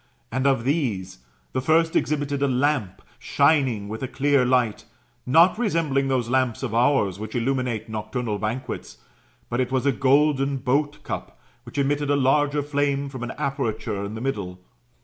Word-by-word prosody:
And 130 +1 0
of 135 -4 +2
these, 115 - -1 0.3
the 130 - -1
first 160 +4 +2
exhibited 145 -2 0
a 140 - +3
lamp 130 -6 0 0.2
shining 135 -8 +2
with 110 +2 -6
a 130 - -2
clear 140 0 +2
light, 125 -4 +1 0.4
not 170 - +5
resembling 160 - +1
those 130 -3 0
lamps 130 -1 0
of 120 -5 -3
ours 115 -6 +2
which 110 +2 -6
illuminate 120 -2 -1
nocturnal 110 0 -3
banquets; 110 - -4 0.5
but 120 +1 -2
it 130 0 0
was 130 0 0
a 140 - +4
golden 135 +1 +2
boat 140 +3 -1
cup, 60 +1 -6 0.3
which 120 - -9
emitted 145 +1 0
a 145 - +3
larger 145 +2 +2
flame 140 -1 -1
from 130 -2 -8
an 120 - -4
aperture 110 -7 -2
in 100 +2 -5
the 110 - -6
middle. 100 -9 -3
130 Hz, 165 wpm, -24 LUFS, 115-145 Hz, 0.5 s, not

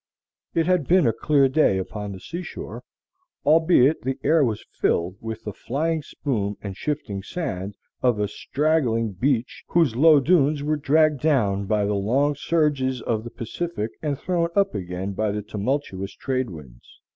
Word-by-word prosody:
It 165 - +2
had 180 -5 +1
been 180 -2 +4
a 115 - +3
clear 140 +4 +3
day 135 -7 +3
upon 105 +2 -5
the 95 - -8
sea 170 - -6
shore, - - -7 0.6
albeit 160 -2 +4
the 130 +1 -2
air 155 +1 +4
was 110 -5 -2
filled 90 +2 0
with 110 0 -6
the 105 - -5
flying 155 - -2
spume 105 -9 -3
and 100 -2 -6
shifting 105 -6 -3
sand 100 - -4 0.3
of 120 -4 +2
a 105 - +1
straggling 120 -2 0
beach 125 +5 -1
whose 165 -9 +2
low 150 +3 +6
dunes 145 -1 +3
were 155 +1 +1
dragged 150 0 +3
down 105 -10 +1
by 105 -1 +1
the 105 - 0
long 125 +9 +1
surges 145 -4 0
of 110 -2 -1
the 120 - -7
Pacific 115 0 -4
and 145 -3 -1
thrown 170 +1 0
up 200 -1 +2
again 90 +2 -4
by 105 +2 0
the 105 +1 -3
tumultuous 105 -2 -3
trade 130 -3 -2
winds. 70 -9 -13
130 Hz, 170 wpm, -24 LUFS, 105-155 Hz, 0.6 s, low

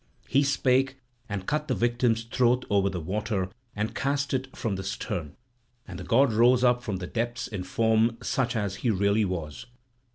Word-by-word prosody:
He 140 - +3
spake, 135 -1 +2 0.3
and 100 -3 -4
cut 150 +4 -1
the - - 0
victim's 120 -1 +1
throat 125 +2 +1
over 100 -1 +3
the 95 -2 -4
water 95 +2 -2 0.3
and 105 +1 -2
cast 140 0 -1
it 130 0 -3
from 110 -4 -1
the 95 - -4
stern. 85 -5 -4 0.5
And 90 -2 -8
the - - -6
god 125 +3 +3
rose 120 +3 +4
up 125 -1 +4
from 110 -5 -3
the 90 - -5
depths 120 +4 -3
in 105 -4 -5
form 110 +3 +2
such 125 -2 -1
as 100 -3 -2
he 120 - -1
really 100 +1 +2
was. 80 -6 -5
115 Hz, 185 wpm, -27 LUFS, 100-125 Hz, 0.5 s, rose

